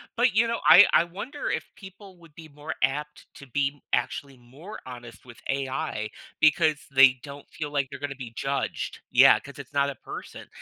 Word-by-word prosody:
But 240 Hz, -2 st, +2 dB
you 230 Hz, +1 st, +4 dB
know, 230 Hz, 0 st, -2 dB
I 205 Hz, -, +10 dB
I -, -, +6 dB
wonder 205 Hz, -, -6 dB
if 160 Hz, +1 st, -3 dB
people 190 Hz, -2 st, -14 dB
would 165 Hz, -3 st, -19 dB
be 160 Hz, -1 st, -11 dB
more 150 Hz, +2 st, -7 dB
apt 150 Hz, +3 st, -2 dB
to 140 Hz, -, -13 dB
be 140 Hz, +2 st, -2 dB
actually 135 Hz, +2 st, -2 dB
more 140 Hz, -, -12 dB
honest 120 Hz, -2 st, -11 dB
with 120 Hz, -2 st, -13 dB
AI 135 Hz, -5 st, -2 dB, 0.3 s
because 155 Hz, 0 st, +4 dB, 0.2 s
they 130 Hz, -1 st, +6 dB
don't 140 Hz, 0 st, -11 dB
feel 150 Hz, -2 st, -6 dB
like 140 Hz, -2 st, 0 dB
they're 140 Hz, -1 st, -9 dB
gonna 145 Hz, -1 st, -5 dB
be 125 Hz, -4 st, -9 dB
judged. 135 Hz, +3 st, -3 dB
Yeah, -, -, +7 dB
'cause -, -, -13 dB
it's -, -, -11 dB
not 140 Hz, 0 st, +2 dB
a 140 Hz, -, -6 dB
person. -, -, -10 dB
145 Hz, 190 wpm, -26 LUFS, 135-170 Hz, 0.3 s, I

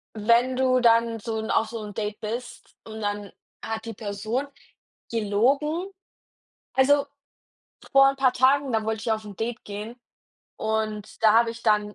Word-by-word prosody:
wenn 235 Hz, +4 st, +3 dB
du 255 Hz, -1 st, +3 dB
dann 230 Hz, -1 st, +3 dB
so 220 Hz, +1 st, -3 dB
'n 220 Hz, -, -4 dB
auf 220 Hz, -, +2 dB
so 230 Hz, -1 st, -6 dB
'n 205 Hz, -1 st, -8 dB
Date 210 Hz, 0 st, -3 dB
bist 235 Hz, +3 st, -6 dB
und 220 Hz, 0 st, -8 dB
dann 205 Hz, -1 st, -3 dB, 0.3 s
hat 220 Hz, 0 st, -4 dB
die 230 Hz, -1 st, -6 dB
Person 215 Hz, +5 st, -3 dB, 0.6 s
gelogen, 275 Hz, -, 0 dB, 0.8 s
also, 280 Hz, +2 st, +4 dB, 0.9 s
vor 275 Hz, 0 st, +7 dB
'n 275 Hz, -, -7 dB
paar 265 Hz, -2 st, +3 dB
Tagen, 270 Hz, +1 st, +3 dB
da 220 Hz, -1 st, +1 dB
wollte 220 Hz, -1 st, -2 dB
ich 230 Hz, -1 st, 0 dB
auf 220 Hz, 0 st, -3 dB
'n 205 Hz, -2 st, -10 dB
Date 225 Hz, 0 st, -4 dB
gehen 210 Hz, +3 st, -7 dB, 0.6 s
und 215 Hz, -1 st, -3 dB
da 215 Hz, -, +6 dB
habe 230 Hz, +1 st, +4 dB
ich 230 Hz, 0 st, -10 dB
dann 210 Hz, -2 st, +2 dB
225 Hz, 165 wpm, -25 LUFS, 215-255 Hz, 0.9 s, vor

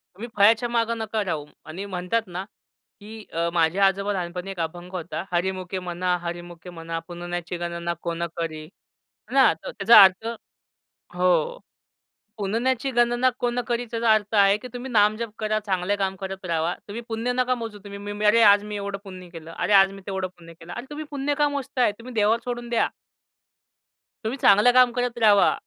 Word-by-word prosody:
तुम्ही 230 Hz, +6 st, -7 dB
फळ्याच्या 225 Hz, +4 st, +5 dB
मागे 230 Hz, -1 st, +1 dB
नका 220 Hz, -1 st, -2 dB
राहू 155 Hz, -5 st, -3 dB, 0.2 s
आणि 180 Hz, +6 st, -6 dB
म्हणतात 190 Hz, +4 st, -1 dB
ना, 180 Hz, +1 st, -5 dB, 0.6 s
की 215 Hz, +1 st, -10 dB
अ, 170 Hz, +1 st, 0 dB
माझ्या 175 Hz, +4 st, +3 dB
आजोबा 200 Hz, +2 st, -1 dB
लहानपणी 180 Hz, 0 st, -4 dB
एक 190 Hz, -, -9 dB
अभंग 175 Hz, +2 st, -5 dB
होता, 175 Hz, -1 st, -4 dB
"हरीमुखे 185 Hz, +1 st, -2 dB
म्हणा, 180 Hz, 0 st, -1 dB
हरीमुखे 175 Hz, 0 st, -7 dB
म्हणा. 165 Hz, -1 st, -5 dB
पुण्याची 175 Hz, 0 st, -5 dB
गणना 170 Hz, 0 st, -3 dB
कोण 170 Hz, 0 st, -3 dB
करी." 155 Hz, -2 st, -4 dB, 0.6 s
ना, 270 Hz, -5 st, +6 dB
तर 160 Hz, -, -9 dB
त्याचा 210 Hz, 0 st, +8 dB
अर्थ 190 Hz, +4 st, +3 dB, 0.9 s
हो. 185 Hz, -, +1 dB, 0.8 s
पुण्याची 235 Hz, +6 st, -1 dB
गणना 240 Hz, +1 st, +3 dB
कोण 245 Hz, 0 st, 0 dB
करी 240 Hz, 0 st, -1 dB
त्याचा 230 Hz, -1 st, +3 dB
अर्थ 215 Hz, 0 st, 0 dB
आहे, 200 Hz, 0 st, +5 dB
की 250 Hz, -, -9 dB
तुम्ही 250 Hz, +1 st, -6 dB
नामजप 215 Hz, +1 st, +2 dB
करा 215 Hz, 0 st, 0 dB
चांगले 190 Hz, +1 st, 0 dB
काम 190 Hz, -1 st, -1 dB
करत 190 Hz, 0 st, -6 dB
राहावा. 165 Hz, 0 st, 0 dB
तुम्ही 215 Hz, +3 st, -6 dB
पुण्य 225 Hz, +2 st, -1 dB
नका 255 Hz, 0 st, +1 dB
मोजू 225 Hz, -3 st, -7 dB
तुम्ही, 200 Hz, 0 st, -8 dB, 0.2 s
"मी 210 Hz, +1 st, -3 dB
अरे 220 Hz, +3 st, +5 dB
आज 205 Hz, -1 st, +6 dB
मी 210 Hz, 0 st, -6 dB
एवढं 200 Hz, 0 st, -4 dB
पुण्य 185 Hz, -2 st, -10 dB
केलं. 165 Hz, -1 st, -10 dB
अरे 210 Hz, -, 0 dB
आज 195 Hz, -1 st, +6 dB
मी 195 Hz, -, -11 dB
तेवढं 190 Hz, -1 st, -2 dB
पुण्य 170 Hz, -1 st, -13 dB
केलं." 165 Hz, +1 st, -11 dB
अरे 240 Hz, -, -6 dB
तुम्ही 305 Hz, +1 st, -6 dB
पुण्य 285 Hz, 0 st, -1 dB
का 295 Hz, 0 st, +4 dB
मोजताय? 275 Hz, -4 st, 0 dB
तुम्ही 250 Hz, +2 st, -10 dB
देवावर 215 Hz, +2 st, +3 dB
सोडून 240 Hz, -1 st, -4 dB
द्या. 235 Hz, -, +1 dB, 1.4 s
तुम्ही 225 Hz, +5 st, -2 dB
चांगलं 210 Hz, 0 st, +6 dB
काम 250 Hz, -1 st, +6 dB
करत 245 Hz, 0 st, -2 dB
राहावा. 210 Hz, -3 st, +5 dB
200 Hz, 180 wpm, -24 LUFS, 180-230 Hz, 1.4 s, त्याचा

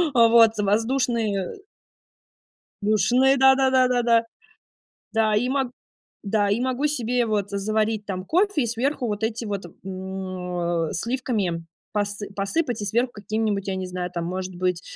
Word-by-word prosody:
Э, 230 Hz, -1 st, +7 dB
вот, 230 Hz, -1 st, +7 dB
воздушные 220 Hz, -1 st, 0 dB, 1.3 s
душные, 245 Hz, +6 st, +3 dB
да 265 Hz, 0 st, +6 dB
да 265 Hz, 0 st, +2 dB
да 260 Hz, -1 st, +4 dB
да 245 Hz, -1 st, +2 dB
да. 230 Hz, -1 st, +4 dB, 0.9 s
Да, 220 Hz, -1 st, +2 dB
и 245 Hz, +4 st, +1 dB
мог 265 Hz, -1 st, 0 dB, 0.5 s
Да, 205 Hz, -1 st, +1 dB
и 205 Hz, +4 st, +1 dB
могу 260 Hz, +3 st, 0 dB
себе 245 Hz, -4 st, 0 dB
вот 205 Hz, -3 st, -1 dB
заварить 215 Hz, +1 st, 0 dB
там 185 Hz, -2 st, -4 dB
кофе- 360 Hz, -, +2 dB
и -, -, 0 dB
сверху 250 Hz, +3 st, -1 dB
вот 210 Hz, 0 st, -3 dB
эти 225 Hz, +1 st, -2 dB
вот, 200 Hz, -2 st, -3 dB, 0.2 s
м, 190 Hz, -, -5 dB, 0.6 s
а, 170 Hz, -2 st, 0 dB
сливками 205 Hz, -6 st, -2 dB, 0.3 s
посы 205 Hz, 0 st, -2 dB
посыпать, 240 Hz, +5 st, -1 dB
и -, -, -3 dB
сверху 240 Hz, +4 st, 0 dB
какими-нибудь, 210 Hz, -1 st, -2 dB
я 195 Hz, -, -1 dB
не 185 Hz, -1 st, -4 dB
знаю, 180 Hz, -1 st, -4 dB
там 170 Hz, -2 st, -3 dB
может 185 Hz, +1 st, -4 dB
быть 180 Hz, 0 st, -1 dB
220 Hz, 155 wpm, -24 LUFS, 195-245 Hz, 1.3 s, Э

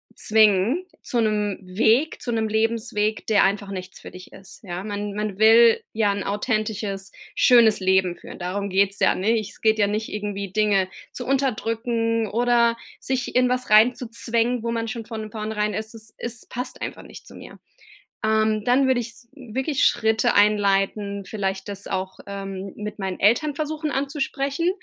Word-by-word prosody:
zwingen 215 Hz, -, +3 dB, 0.2 s
zu 240 Hz, -, -2 dB
'nem 210 Hz, -2 st, 0 dB
Weg 220 Hz, +11 st, +1 dB
zu 260 Hz, -5 st, -3 dB
'nem 225 Hz, -1 st, 0 dB
Lebensweg, 220 Hz, -1 st, -1 dB
der 215 Hz, -2 st, +4 dB
einfach 200 Hz, 0 st, -1 dB
nichts 185 Hz, -1 st, -7 dB
für -, -, -11 dB
dich 180 Hz, 0 st, -12 dB
ist, 190 Hz, 0 st, -13 dB
ja. 180 Hz, -1 st, -5 dB
Man 205 Hz, 0 st, -4 dB
man 210 Hz, -2 st, -3 dB
will 225 Hz, +1 st, +6 dB
ja 215 Hz, -2 st, +2 dB
'n 200 Hz, -, -4 dB
authentisches, 205 Hz, -2 st, -2 dB, 0.2 s
schönes 235 Hz, -4 st, +5 dB
Leben 190 Hz, -1 st, +2 dB
führen. -, -, -11 dB
Darum 195 Hz, +3 st, -3 dB
geht's 195 Hz, +1 st, +1 dB
ja, -, -, +3 dB
ne? 220 Hz, +5 st, +1 dB
Es 210 Hz, -2 st, -9 dB
geht 220 Hz, 0 st, +3 dB
ja 205 Hz, -, +4 dB
nicht 215 Hz, +2 st, -2 dB
irgendwie 200 Hz, -2 st, -4 dB
Dinge 205 Hz, -3 st, +2 dB, 0.3 s
zu 250 Hz, -, -6 dB
unterdrücken 230 Hz, -3 st, 0 dB
oder 235 Hz, +1 st, +2 dB, 0.2 s
sich 255 Hz, -2 st, -3 dB
in 250 Hz, 0 st, +4 dB
was 250 Hz, -2 st, -1 dB
rein 220 Hz, +4 st, +6 dB
zu 250 Hz, -, -6 dB
zwängen, 235 Hz, +1 st, 0 dB
wo 230 Hz, -, -1 dB
man 230 Hz, 0 st, -2 dB
schon 230 Hz, +1 st, -5 dB
von 220 Hz, -1 st, -7 dB
vornherein 215 Hz, -1 st, -2 dB
es 220 Hz, +1 st, -5 dB
ist 220 Hz, 0 st, -7 dB
es 235 Hz, -1 st, -3 dB
passt 250 Hz, +2 st, -6 dB
einfach -, -, -6 dB
nicht -, -, -13 dB
zu -, -, -13 dB
mir. -, -, -12 dB, 0.6 s
Ähm, 215 Hz, -1 st, +1 dB
dann 260 Hz, +2 st, +3 dB
würde 260 Hz, -2 st, +2 dB
ich 235 Hz, -, -6 dB
s 235 Hz, 0 st, -14 dB
wirklich 265 Hz, +2 st, -1 dB
Schritte 220 Hz, -1 st, +2 dB
einleiten, 200 Hz, 0 st, +2 dB
vielleicht 195 Hz, -1 st, -3 dB
das 200 Hz, 0 st, -6 dB
auch, 190 Hz, 0 st, -4 dB
ähm, 195 Hz, -1 st, -6 dB
mit 210 Hz, 0 st, -7 dB
meinen 190 Hz, -2 st, -4 dB
Eltern 245 Hz, +8 st, +3 dB
versuchen 310 Hz, +1 st, -3 dB
anzusprechen. 280 Hz, +3 st, -1 dB
215 Hz, 175 wpm, -23 LUFS, 200-235 Hz, 0.6 s, will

